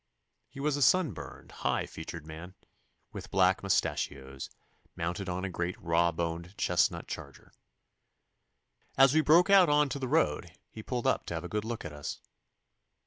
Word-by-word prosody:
He - - -11
was 145 0 0
a - - -3
sun 155 +3 +4
burned, 70 -6 -10
high - - -1
featured 80 0 -8
man, 80 +4 -9 0.6
with - - -8
black 95 -1 +3
mustachios, 70 -8 -2 0.5
mounted 90 +4 -3
on 90 +1 -2
a - - -3
great 90 +1 -3
raw 85 0 +2
boned 85 +3 -4
chestnut - - +1
charger. - - -9 1.5
As 135 0 +6
we 155 - +5
broke 170 +6 +5
out 190 -4 +7
on 150 -1 +3
to 140 - -4
the 130 - -3
road 125 - 0
he 110 - -8
pulled 120 +2 -4
up 130 - +1
to 85 - -3
have 80 - -4
a - - -5
good 105 +3 -2
look 115 -4 -5
at 80 - -6
us. 75 0 -6
95 Hz, 170 wpm, -30 LUFS, 85-135 Hz, 1.5 s, out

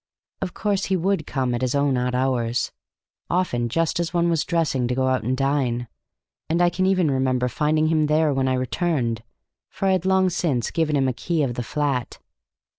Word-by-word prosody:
Of 180 - -4
course 200 -2 0
he 190 - +1
would 180 -3 0
come 130 -3 -1
at 120 - -2
his 130 +1 0
own 140 -1 +2
odd 125 0 -1
hours, 125 -2 0 0.6
often 125 -10 0
just 165 +6 0
as 170 -1 -1
one 170 -1 +2
was 165 -2 +1
dressing 155 -8 0
to 125 - -1
go 130 0 +1
out 130 0 +1
and 130 +3 -1
dine, 130 -3 0 0.6
and 165 +2 +1
I 175 0 +4
can 185 +2 0
even 185 -6 +2
remember 130 -1 +1
finding 155 +4 +1
him 155 -2 +2
there 155 0 +2
when 135 -1 0
I 130 - +2
returned, 130 -3 -1 0.5
for 195 - -2
I - - +4
had 185 -1 +1
long 190 -1 +3
since 140 -9 -1
given 160 -3 0
him 135 -2 +2
a 130 - 0
key 165 +5 -1
of 125 -3 -1
the 125 - -3
flat. 135 -1 -2
145 Hz, 205 wpm, -23 LUFS, 125-170 Hz, 0.6 s, I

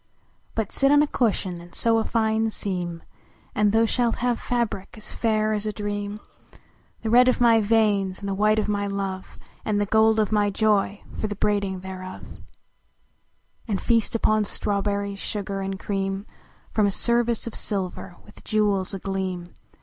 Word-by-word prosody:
But 220 -3 -1
sit 275 0 +3
on 290 0 +6
a - - 0
cushion 195 -9 -1
and 175 0 -14
sew 230 -1 +3
a - - 0
fine 220 -1 +1
seam, 180 -5 -3 0.5
And 210 -1 +3
thou 225 +1 +4
shalt 235 0 +1
have 245 -1 0
fabric 235 -5 -2
as 215 - -6
fair 215 -1 +1
as 210 0 -1
a - - 0
dream, 205 0 -4 0.8
The 220 - -1
red 250 +2 +7
of 255 - +1
my 230 -2 +5
veins, 205 -3 +2
and 200 - -6
the 195 - -1
white 210 +2 +3
of 215 - +1
my 205 -1 -1
love, 195 -1 -4 0.3
And 210 -1 0
the 205 - +1
gold 220 +1 +4
of 215 -1 +1
my 205 -1 +3
joy 205 -1 +1 0.2
for 215 - -1
the 205 - -4
braiding 200 -2 0
thereof, 185 0 -8 1.4
And 200 -4 -1
feast 230 -1 +1
upon 215 -1 +2
strawberries, 200 0 -1
sugar 200 -2 -3
and 195 0 -3
cream 195 0 -2 0.5
From 210 -2 +3
a - - +2
service 235 +2 +2
of 230 - -5
silver, 190 -2 -3
with 210 - -17
jewels 205 -3 +1
agleam. 185 -2 -4
205 Hz, 170 wpm, -24 LUFS, 195-220 Hz, 1.4 s, red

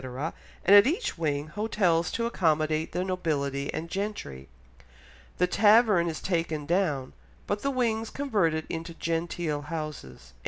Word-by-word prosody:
and 200 - +8
at 205 +4 +8
each 365 - -1
wing, 150 -3 -1
hotels 175 -3 +1
to 230 - -2
accommodate 155 -6 +1
the 180 - -1
nobility 145 -7 -2
and 165 - -4
gentry. 170 - -5 0.9
The 180 - +3
tavern 205 -1 +4
is 160 - -6
taken 165 -5 -1
down, 150 -6 0 0.3
but 205 0 -2
the 275 - 0
wings 230 -4 0
converted 195 - 0
into 165 0 -5
genteel 165 -2 -2
houses." 150 - -7
170 Hz, 130 wpm, -27 LUFS, 155-205 Hz, 0.9 s, and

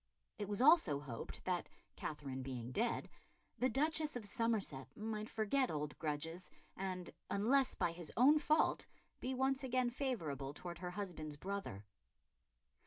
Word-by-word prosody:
It 205 -1 -3
was 205 +4 +1
also 300 - +7
hoped 125 -6 -7
that, 180 -1 0 0.3
Katherine 135 -3 -4
being 125 -2 -4
dead, 230 - 0 0.5
the 255 - +3
Duchess 305 +4 +1
of 240 -4 -3
Somerset 205 - 0
might 215 0 -3
forget 245 +5 +2
old 150 -1 -2
grudges 160 +3 -3 0.3
and, 185 -2 -3 0.2
unless 255 +7 +3
by 175 -2 +1
his 170 -1 -7
own 285 +6 +7
fault, 305 +1 +3 0.3
be 260 +1 -2
once 265 +1 +1
again 255 -1 +1
favourable 155 - -2
towards 175 -1 -6
her 180 0 -3
husband's 175 -6 -5
brother. 190 - -4
200 Hz, 140 wpm, -38 LUFS, 150-255 Hz, 0.5 s, also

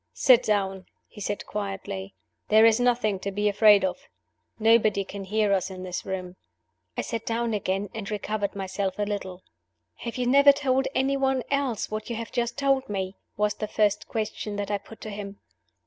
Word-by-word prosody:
"Sit 255 -3 +6
down," 195 -4 -1 0.2
he 210 - -12
said, 205 +1 -3
quietly. 195 -1 -5 0.3
"There's 220 +1 +6
nothing 240 -5 +2
to 200 - -4
be 205 +2 0
afraid 205 -1 +6
of. 190 +8 -2 0.6
Nobody 220 -2 +4
can 195 0 -7
hear 210 +1 +1
us 190 0 0
in 185 -1 -8
this 180 +1 -5
room." 185 -1 -5 0.6
I - - +1
sat 230 -2 -4
down 230 0 -1
again, 195 0 -1
and 215 -3 -5
recovered 210 -1 -2
myself 190 0 -3
a 210 - 0
little. 190 -3 -4 0.5
"Have 235 +1 -6
you 250 - 0
never 280 +3 +7
told 270 -1 +1
any 275 +1 +2
one 265 -2 +1
else 275 -8 -1
what 215 +1 -4
you 235 - -2
have 230 0 -6
just 240 0 -1
told 275 -2 +1
me?" 190 -1 -3 0.2
was 210 0 +2
the 215 - -4
first 210 -1 +1
question 215 -1 -3
that 205 0 -3
I 205 - 0
put 220 +2 -14
to 215 - -6
him. 200 -1 -7
210 Hz, 185 wpm, -26 LUFS, 195-230 Hz, 0.6 s, never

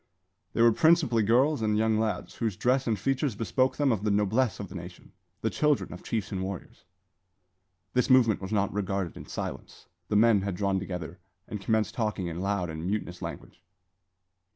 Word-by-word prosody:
They 115 - +3
were 115 - +7
principally 155 -4 +4
girls 125 +6 +3
and 105 -1 +1
young 110 0 +2
lads, 110 -5 -2
whose 110 -6 -2
dress 130 +1 +1
and 110 -2 +1
features 135 -1 0
bespoke 130 +4 0
them 145 -2 +3
of 105 -3 -1
the 105 - +1
noblesse 105 +4 +1
of 100 - -5
the - - -12
nation, 90 -1 -9 0.3
the 110 - 0
children 150 -9 +1
of 90 - -9
chiefs 110 -5 -3
and 95 -2 -2
warriors. 95 -1 -7 1.1
This 125 +1 +2
movement 120 -6 +5
was 95 +1 -6
not 100 -2 +1
regarded 95 -3 -2
in - - -10
silence. - - -6 0.2
The 105 - -1
men 110 -1 +5
had 100 -1 -3
drawn 100 0 0
together, 90 -3 -6 0.3
and 105 - -6
commenced 110 +1 +1
talking 105 -5 -2
in 85 0 -4
loud 100 -2 0
and 80 0 -6
mutinous 95 -3 -3
language. - - -8
105 Hz, 185 wpm, -28 LUFS, 95-115 Hz, 1.1 s, were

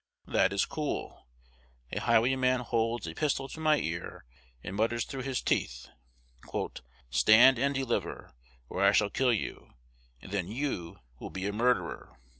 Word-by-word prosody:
That 95 - +2
is 100 0 +1
cool. 150 -2 -5 0.6
A - - -2
highwayman 125 +2 +3
holds 115 -2 -1
a 80 - -5
pistol 135 - -1
to 160 - -8
my 155 -1 +3
ear, 85 - -5 0.4
and 90 - -6
mutters 115 +2 0
through 135 -1 -6
his 130 -1 -2
teeth, - - -1 1.2
"Stand 115 - +6
and 140 +2 +1
deliver, 135 -3 -3 0.3
or 95 - -2
I 100 +1 +6
shall 100 -1 +3
kill 130 0 +2
you; 110 - -4 0.4
and - - -12
then 100 -4 -1
you 110 - -3 0.2
will - - -7
be 95 0 -5
a 100 - -1
murderer!" 125 +3 -1
115 Hz, 150 wpm, -30 LUFS, 100-130 Hz, 1.2 s, Stand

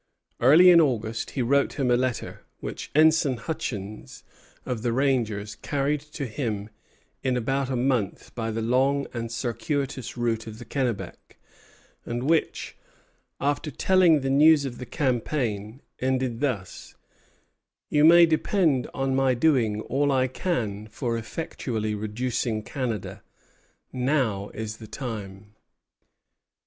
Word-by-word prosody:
Early 160 +9 +8
in 170 -1 +8
August 115 -6 -1
he 130 - +2
wrote 140 +4 +2
him 135 -4 0
a - - +5
letter, 125 -1 -2 0.2
which - - -6
Ensign 155 -4 +4
Hutchins, 115 -8 -6 0.4
of 120 -3 -3
the 120 0 0
rangers, 115 -6 0
carried 145 +7 -1
to 140 - -3
him 110 -4 -4 0.5
in 130 -2 0
about 135 +3 -1
a 130 - -1
month 125 -5 -1
by 115 -2 -3
the 110 0 -2
long 135 +4 +2
and 115 -1 -4
circuitous 125 +2 -3
route 115 -2 -1
of 110 -1 -8
the 120 - -10
Kennebec, 125 -3 -4 0.7
and 120 +1 -4
which, 160 0 0 0.6
after 145 +2 -1
telling 170 0 +4
the 135 0 -1
news 150 +1 +6
of 125 -3 -6
the 125 - -7
campaign, 120 -3 -2 0.2
ended 130 -2 -1
thus: 115 -11 -3 1.0
"You 150 0 +4
may 170 +2 +8
depend 160 -4 +1
on 135 -1 0
my 135 -1 +3
doing 120 -6 +2
all 140 +5 0
I 130 -1 +2
can 110 - -3
for 115 +2 -3
effectually 115 -3 -3
reducing 110 +1 -2
Canada. 120 -5 -4 0.7
Now 125 -7 0
is 110 0 -5
the 110 - -11
time!" 105 -4 -7
125 Hz, 130 wpm, -26 LUFS, 110-140 Hz, 1.0 s, Early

